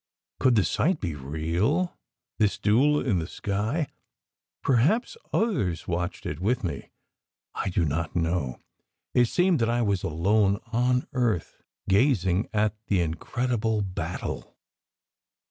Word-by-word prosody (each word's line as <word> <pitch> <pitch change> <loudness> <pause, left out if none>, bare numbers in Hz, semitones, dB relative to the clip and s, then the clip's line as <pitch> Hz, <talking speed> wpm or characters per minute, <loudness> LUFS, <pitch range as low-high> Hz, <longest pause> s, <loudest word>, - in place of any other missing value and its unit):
Could 130 -2 +4
the 105 - +4
sight 155 - +1
be 85 -5 -2
real, 85 - -1 0.4
this 105 -2 +2
duel 140 +8 +3
in 105 -9 +2
the 80 - -3
sky? 110 - -1 0.8
Perhaps 145 - +2 0.2
others 105 - 0
watched 85 0 -3
it 75 - -4
with 110 +6 0
me 80 -7 -4 0.6
I - - -2
do 90 -2 +1
not 80 +3 -2
know. 80 -6 -1 0.5
It 125 - +5
seemed 175 +5 +2
that 115 0 +2
I 120 0 +1
was 100 -4 +1
alone 100 +5 +2 0.2
on 125 +2 +2
earth 120 -9 -1 0.3
gazing 100 -3 +2
at 105 -1 +1
the 100 - +2
incredible 110 +6 -1
battle. 90 -3 -5
105 Hz, 130 wpm, -26 LUFS, 85-125 Hz, 0.8 s, It